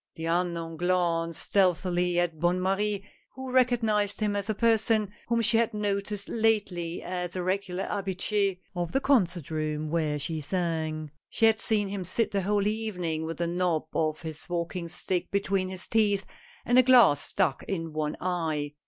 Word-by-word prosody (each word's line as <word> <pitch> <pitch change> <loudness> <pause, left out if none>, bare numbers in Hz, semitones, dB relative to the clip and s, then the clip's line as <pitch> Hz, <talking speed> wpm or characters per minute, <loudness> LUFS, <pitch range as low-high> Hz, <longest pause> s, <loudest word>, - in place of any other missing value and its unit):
The 160 - -5
unknown 170 -1 -1
glanced 170 -2 0
stealthily 180 -2 +2
at 170 -3 -1
Bonne 175 +2 +2
Marie, 200 +2 0 0.3
who 260 0 -6
recognized 225 -5 +2
him 210 -2 0
as 200 +1 -3
a 215 - 0
person 225 -2 +2 0.2
whom 235 -1 +1
she 225 +1 +5
had 230 -1 +1
noticed 200 -1 -2
lately 200 -7 0
as 180 0 -4
a 180 - -2
regular 190 0 -1
habitu^ 195 0 -1 0.2
of 175 -1 -3
the 270 - +3
concert 185 - +1
room 155 -1 -2
where 155 -3 0
she 155 +3 -3
sang. 155 -2 -2 0.2
She 225 - +2
had 220 -1 +4
seen 210 -3 +1
him 195 -1 -4
sit 215 +6 -1
the 200 - 0
whole 200 +1 +1
evening 180 -7 -2
with 165 - -5
the 170 - 0
knob 170 -2 0
of 155 +1 -1
his 160 0 -7
walking 170 0 -3
stick 175 +1 -2
between 195 -1 0
his 185 -1 -6
teeth 210 -3 +2 0.4
and 245 +1 +5
a - - +10
glass 240 - +6
stuck 175 -9 0
in 165 -4 -3
one 155 -1 -2
eye. 160 -5 -2
185 Hz, 170 wpm, -28 LUFS, 165-210 Hz, 0.4 s, a